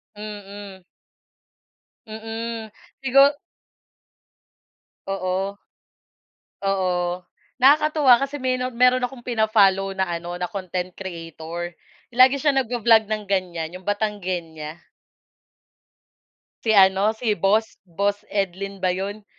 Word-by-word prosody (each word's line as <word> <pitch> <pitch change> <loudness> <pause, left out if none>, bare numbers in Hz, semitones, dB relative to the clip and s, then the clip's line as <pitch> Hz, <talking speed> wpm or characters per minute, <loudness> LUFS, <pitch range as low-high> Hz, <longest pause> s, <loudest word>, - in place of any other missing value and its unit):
Mm. 205 -2 -9 1.2
Mm, 225 +1 -6 0.3
siguro 275 +2 +5 1.7
Oo. 195 +1 -2 1.1
Oo 180 -2 0 0.4
nakakatuwa 285 -1 +5
kasi 275 +1 -3
meno 255 -1 0
meron 250 +1 +4
akong 250 -1 -4
pina-follow 200 -4 +2
na 190 - +1 0.2
ano 175 +1 -6
na 180 0 -3
content 185 -2 -4
creator 170 -1 -7 0.4
lagi 255 +3 +6
siya 290 +1 +2
nag 265 -3 0
vo-vlog 225 -2 +3
ng 215 -1 -2
ganyan 175 -4 -2
'yong 185 +2 -12
Batanguena. 180 -7 -3 1.9
Si 220 - +2
ano, 195 +1 +5
si 220 -3 0
boss 210 +5 +1
boss 200 +3 -1
Edlin 195 0 -3
ba 185 -1 +1
'yon 200 +3 -5
200 Hz, 100 wpm, -23 LUFS, 185-230 Hz, 1.9 s, lagi